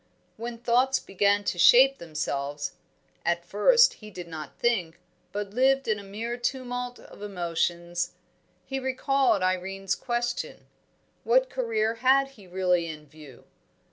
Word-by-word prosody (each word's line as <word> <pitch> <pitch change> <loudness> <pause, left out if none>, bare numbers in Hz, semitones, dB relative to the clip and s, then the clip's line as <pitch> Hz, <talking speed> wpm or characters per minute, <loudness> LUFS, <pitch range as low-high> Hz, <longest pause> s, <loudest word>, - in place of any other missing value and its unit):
When 235 +1 -6
thoughts 250 +3 +2
began 200 +1 +1
to 180 -2 -2
shape 265 +8 +7
themselves 145 -3 -3 0.5
(at 170 0 0
first 480 - +5
he 215 - -9
did 180 -4 -8
not 155 -2 -8
think, 180 -9 0 0.3
but 205 -1 -4
lived 270 +4 +2
in 215 -2 +1
a - - -10
mere 225 +5 -5
tumult 245 0 -3
of - - -15
emotions) 175 -2 -2 0.5
he 270 0 -3
recalled 265 -4 +1
Irene's 190 +1 -1
question: 240 -1 -3 0.6
what - - +3
career 225 -3 0
had 270 +1 +4
he 210 -8 -17
really 180 -2 +1
in 155 -2 -8
view? 145 -3 -15
210 Hz, 135 wpm, -27 LUFS, 175-250 Hz, 0.6 s, shape